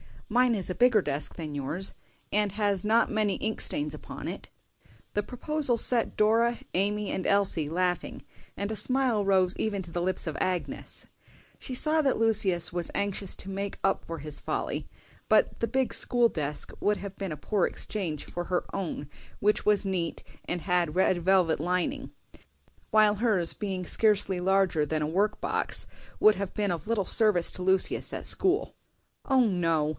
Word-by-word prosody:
Mine 245 +1 +3
is 190 -3 -3
a - - -1
bigger 245 -4 +4
desk 145 -3 -3
than 155 -3 -6
yours, 150 +7 -3 0.4
and 210 -1 +1
has 205 -2 0
not 225 +2 +3
many 215 -2 0
ink 220 0 -3
stains 150 0 +1
upon 150 - -8
it." - - -8 0.6
The 205 - +1
proposal 260 +4 0
set 235 0 +2
Dora, 230 +2 +2 0.2
Amy, 205 +2 0
and 185 - -2
Elsie 195 -7 +2
laughing, 180 +1 -2 0.3
and 200 +2 -4
a - - -3
smile 255 -3 0
rose 190 -2 +2
even 205 -3 -2
to 170 - -11
the 175 - -2
lips 185 +1 0
of 155 - -3
Agnes. 180 -1 -3 0.5
She 255 - -5
saw 310 +4 +3
that 275 -3 +1
Lucius 195 -6 +2
was 175 -1 -1
anxious 200 -1 -1
to 195 - -6
make 195 +1 -4
up 195 - 0
for 165 -1 -6
his 150 0 -5
folly; - - -3 0.4
but - - +2
the 230 - 0
big 265 +2 0
school 240 -1 +2
desk 150 -5 -4
would 205 0 +1
have 200 -1 -8
been 195 -5 -4
a - - -8
poor 200 +5 0
exchange 170 -8 -3
for 175 0 -5
her 180 0 -1
own, 170 -7 -4 0.3
which 210 +1 +2
was 210 -1 +3
neat 180 -4 -2 0.2
and 175 -1 -3
had 175 -3 0
red 185 0 +3
velvet 180 -2 +2
lining; 180 - -2 0.8
while 215 -1 +4
hers, 205 -6 +1
being 190 -3 -4
scarcely 205 -2 +2
larger 190 -4 +2
than 155 +1 -2
a 150 - 0
work 200 +6 0
box, - - -1 0.4
would 215 0 +6
have 195 -1 -5
been 205 -3 0
of 165 0 -5
little 220 -4 0
service 210 -7 +3
to - - -8
Lucius 190 +1 +1
at - - -5
school. 385 +3 +6 0.5
"O 265 -2 +3
no! 165 -6 +1
195 Hz, 175 wpm, -28 LUFS, 175-215 Hz, 0.8 s, would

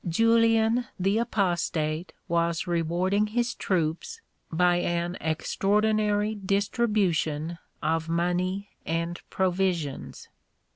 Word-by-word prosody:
Julian 230 +3 +3
the 195 +4 +2
Apostate 175 -6 -1 0.2
was 170 -1 0
rewarding 175 +4 +1
his 240 +3 0
troops 175 - -2 0.3
by 175 +1 +3
an 175 0 -1
extraordinary 210 +5 +1
distribution 195 -6 0 0.2
of 160 +1 0
money 180 +4 0
and 170 +1 -2
provisions. 180 -6 -1
180 Hz, 85 wpm, -27 LUFS, 170-210 Hz, 0.3 s, Julian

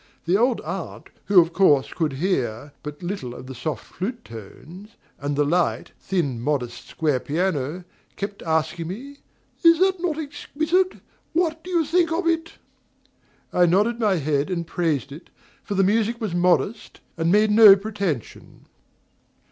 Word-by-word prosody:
The 175 +3 +2
old 240 +3 +2
aunt, 175 +2 -7
who, 200 -2 +6
of 170 0 +2
course, 150 -8 +3
could 155 -4 -1
hear 135 - -2
but 150 +3 -8
little 175 -10 -4
of - - -10
the 130 - -8
soft, 125 0 -4
flute 230 +6 -5
tones, 160 - -12 0.2
and 145 0 -2
the 145 - +2
light, 170 +3 0
thin, 145 -11 -2
modest, 125 -3 -3
square 150 -5 0
piano, 160 +1 -2 0.3
kept 200 0 -5
asking 160 +1 -1
me: 265 +10 -8 0.5
"Is 335 -1 +6
not 375 -1 +2
that 335 -4 -1
exquisite? 315 +4 -1 0.4
what 320 -1 0
do 365 - -9
you 340 -3 +1
think 335 +2 +2
of 335 +2 -1
it?" 330 0 0 1.0
I 175 -1 +4
nodded 210 +7 +2
my 210 -4 +2
head 150 -1 0
and 170 -2 -2
praised 160 -6 -1
it, 150 +6 -11 0.3
for 200 - -5
the 195 - +3
music 225 +4 +1
was 215 -7 -3
modest 180 +5 0 0.2
and 165 0 0
made 210 +2 +4
no 210 -2 +9
pretension. 195 - -5
185 Hz, 155 wpm, -23 LUFS, 150-235 Hz, 1.0 s, no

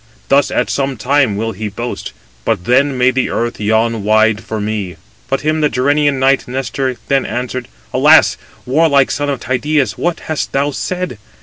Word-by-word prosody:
Thus 140 +1 +4
at - - 0
some 135 -2 -1
time 125 -2 +1
will 115 +1 -2
he 110 +1 -5
boast: 120 +4 -5 0.3
but 85 - -1
then 135 +2 +2
may 125 +1 +4
the 130 0 0
earth 120 0 -2
yawn 110 +1 +1
wide 110 +1 +3
for 110 - -4
me." 105 -4 -3 0.3
But 135 - 0
him 155 +1 0
the 150 - +3
Gerenian 145 +2 +1
knight 135 +1 +2
Nestor 130 0 -2
then 135 -1 +2
answered: 125 0 -4 0.3
"Alas! - - +5 0.3
warlike 140 0 +3
son 145 +1 -1
of 135 -3 -2
Tydeus, 140 +3 0
what 175 0 -1
hast 155 -2 -3
thou 140 +1 +1
said? 180 - -4
130 Hz, 175 wpm, -16 LUFS, 115-140 Hz, 0.3 s, Alas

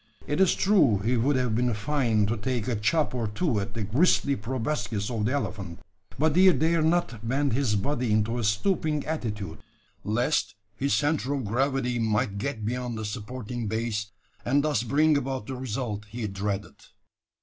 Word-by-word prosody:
It 145 - 0
is 190 - +4
true 190 - +4
he 110 +6 0
would 130 +5 +2
have 125 -3 +1
been 120 0 +1
fain 115 -2 +1
to 110 +3 0
take 120 +1 -2
a 125 - 0
chop 145 +10 +1
or 120 -3 -1
two 110 - 0
at 100 +2 -5
the 110 - -2
gristly 140 - +3
proboscis 110 -2 -2
of 110 -3 -1
the 125 - 0
elephant; 100 -11 -3 0.4
but 155 +2 +2
he 185 +1 +7
dared 160 +2 +2
not 120 -10 0
bend 140 0 +1
his 125 -4 +1
body 120 +3 0
into 110 +3 +1
a - - -2
stooping 150 - 0
attitude, 110 -10 -4 0.4
lest 120 +7 0 0.2
his 140 +5 +1
centre 145 -2 0
of 135 -4 -3
gravity 125 +2 0
might 105 -2 0
get 120 -4 -3
beyond 120 0 -2
the 110 - -4
supporting 115 +2 -5
base, 110 -1 -2 0.4
and 140 +4 +2
thus 150 -7 +1
bring 145 +5 +3
about 130 -4 -3
the 130 - -5
result 120 -4 -4
he 110 +2 -5
dreaded. 100 0 -3
120 Hz, 175 wpm, -27 LUFS, 105-140 Hz, 0.4 s, he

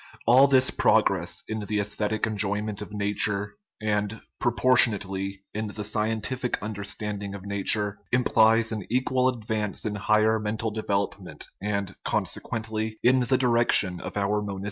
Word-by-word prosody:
All 130 +4 +7
this 130 -1 +5
progress - - +2
in 110 0 -3
the 105 0 -2
aesthetic 105 +1 -1
enjoyment 105 -1 -1
of 105 - -8
nature 105 - -2 0.2
and, 105 0 -1 0.2
proportion 120 -1 +4
ately, 95 0 -5
in 110 +1 -3
the 105 0 -5
scientific 110 +4 -1
understanding 105 -1 -4
of 100 -1 -10
nature 100 +1 0
implies 115 -2 +3
an 110 -3 -3
equal 130 +1 +1
advance 110 -4 -2
in 105 - -1
higher 110 +2 +2
mental 110 +1 -3
development 100 -3 -3 0.2
and, 100 -2 -3
consequently, 110 -1 -2
in 130 +2 +5
the 125 +1 +2
direction 120 -7 +3
of - - -7
our 100 +1 0
monistic 105 - -5
religion. 100 -1 -5
105 Hz, 145 wpm, -26 LUFS, 100-115 Hz, 0.2 s, All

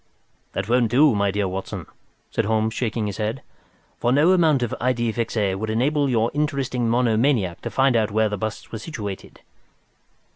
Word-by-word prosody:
"That 95 +1 -3
won't 120 -1 +2
do, 140 +4 +5
my 100 -1 +1
dear 100 0 0
Watson," 95 +1 -5 0.5
said 115 - 0
Holmes, 110 +1 +1
shaking 115 -2 -2
his 100 -2 -4
head, 110 +4 -3 0.6
"for 120 - +1
no 150 +7 +4
amount 160 -8 +3
of 120 - -2
idée 120 -2 0
fixe 115 0 -3 0.2
would 110 +3 -4
enable 140 +6 +1
your 115 -2 +1
interesting 135 -5 -1
monomaniac 115 -5 +1
to - - -4
find 135 -2 +2
out 110 -2 +2
where 110 +1 +2
these 105 -2 -4
busts 110 +1 -5
were 110 - -5
situated." 105 - -7
115 Hz, 175 wpm, -23 LUFS, 110-130 Hz, 0.6 s, do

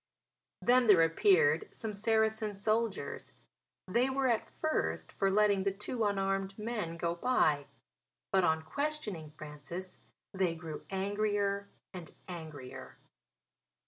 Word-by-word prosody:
'" - - -60
Then 250 0 +5
there 185 -6 +7
appeared 415 - +4
some 220 -2 -5
Saracen 220 0 +1
soldiers. 215 +1 -1 0.5
They 240 +7 +2
were, 265 0 0
at 230 -2 0
first, 315 0 -1
for 195 - +1
letting 200 -1 +3
the 195 - +1
two 210 +4 -3
unarmed 195 -1 0
men 210 -7 -3
go 170 0 0
by; 170 - +2 0.6
but, 190 -1 +4
on 160 -1 +2
questioning 215 - -3
Francis, 155 +5 -8 0.3
they 185 -3 +1
grew 160 -2 -7
angrier 200 0 0 0.2
and 175 -3 -8
angrier. 155 -7 -8
200 Hz, 120 wpm, -32 LUFS, 170-225 Hz, 0.6 s, there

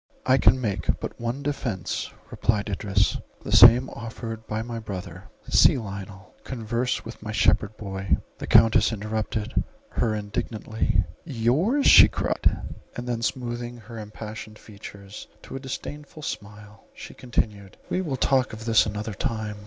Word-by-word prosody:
"I 130 +1 +4
can 115 +4 +5
make 105 -6 -1
but - - -6
one 120 +4 -3
defence," 125 - -3 0.2
replied 105 -2 0
Idris, 100 +1 +1 0.3
"the - - -6
same 120 +2 +8
offered 115 -1 -7
by 110 +1 -2
my 115 0 -5
brother; 100 -5 -7 0.2
see - - +5
Lionel, 100 -3 -8
converse 120 0 -2
with 115 - -9
my 105 0 -5
shepherd 105 0 +2
boy"— 95 -2 -1 0.2
The - - -5
Countess 115 -1 +6
interrupted 110 +1 -2 0.3
her 110 -2 0
indignantly—"Yours!"—she 115 - +3
cried: - - 0 0.3
and 120 0 -5
then, 120 -2 -2
smoothing 120 0 -3
her 115 0 -10
impassioned 110 0 -8
features 100 -1 -11 0.2
to - - -9
a - - -3
disdainful 145 +3 -7
smile, 105 -3 -8
she - - -9
continued—"We 105 - -3
will 145 -8 -2
talk 130 -1 +2
of 110 0 -8
this 115 -2 +4
another 105 +1 -4
time. 105 +1 -3
110 Hz, 135 wpm, -25 LUFS, 105-120 Hz, 0.3 s, same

